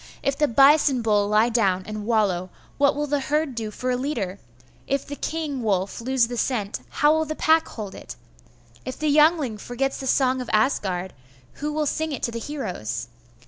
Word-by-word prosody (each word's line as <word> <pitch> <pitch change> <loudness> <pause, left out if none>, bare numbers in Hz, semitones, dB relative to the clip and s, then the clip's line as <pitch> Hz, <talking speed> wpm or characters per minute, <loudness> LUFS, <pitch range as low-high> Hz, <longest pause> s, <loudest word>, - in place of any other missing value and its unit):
If 275 - +1
the 300 0 +2
bison 275 0 +5
bull 205 -2 +2
lie 215 +3 +3
down 195 -6 +1
and 215 0 -6
wallow, 195 -6 +1 0.3
what 280 -1 +4
will 295 +1 -1
the 290 0 0
herd 295 +1 -1
do 225 -2 -4
for 255 +4 -3
a - - +1
leader? 235 -8 -3 0.5
If 275 0 -1
the 285 - -6
king 300 -4 -3
wolf 200 -1 -1
lose 255 0 +2
the 245 0 -5
scent, 220 -5 -1
how 295 +1 +3
will 315 0 +1
the 310 0 -4
pack 320 +1 +3
hold 210 -4 -7
it? - - -9 0.7
If 255 - -6
the 300 -2 +1
Yngling 300 -8 +3
forgets 265 +5 -2
the 265 - -5
song 260 -1 +2
of 250 - -7
Asgard, 190 -6 0 0.5
who 300 +1 -1
will 305 0 -1
sing 315 +2 -1
it 265 - -6
to 235 - 0
the 230 - -4
heroes? 120 - -4
255 Hz, 195 wpm, -24 LUFS, 210-290 Hz, 0.7 s, bison